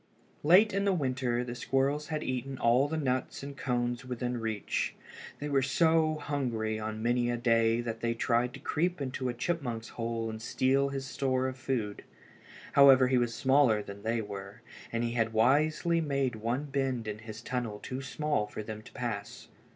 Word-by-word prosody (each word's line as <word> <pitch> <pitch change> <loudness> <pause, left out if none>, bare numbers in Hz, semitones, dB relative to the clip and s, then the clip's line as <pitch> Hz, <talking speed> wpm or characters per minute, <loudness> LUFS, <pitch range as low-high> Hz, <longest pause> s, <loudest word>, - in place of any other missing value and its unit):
Late 185 +7 +6
in 195 +1 +1
the 200 - +3
winter 130 -6 0
the 120 -1 -5
squirrels 135 +4 0
had 155 -1 -3
eaten 130 +1 -3
all 125 +4 +3
the 160 +2 -2
nuts 130 -2 -1
and 140 0 -7
cones 120 -2 -1
within 125 -1 -3
reach. 110 -3 -2 0.4
They 145 - -4
were 140 -2 +2
so 160 +3 +3
hungry 120 -8 -2
on 110 0 -4
many 120 0 +2
a 120 - 0
day 115 -1 +3
that 115 -1 -4
they 115 0 -1
tried 120 +1 +1
to - - -9
creep 175 +2 -1
into 130 -2 -2
a - - -1
chipmunk's 120 -5 -2
hole 115 -1 -3
and 110 0 -6
steal 135 +4 +2
his 135 -1 -4
store 130 -1 0
of 130 - -4
food. 120 -6 -3 0.7
However 135 -2 +7
he 130 -1 +4
was 120 -1 0
smaller 130 -6 +3
than 100 0 -9
they 115 +2 0
were, 100 0 -8 0.3
and 115 0 -1
he 120 - -1
had 115 -2 0
wisely 155 +8 +3
made 140 -5 0
one 115 +5 -2
bend 135 -5 -1
in 105 0 -4
his 110 0 -8
tunnel 120 -5 -3
too 130 +5 -6
small 140 -4 -1
for 105 - -6
them 110 0 -7
to - - -14
pass. 110 -5 -5
125 Hz, 185 wpm, -30 LUFS, 115-140 Hz, 0.7 s, However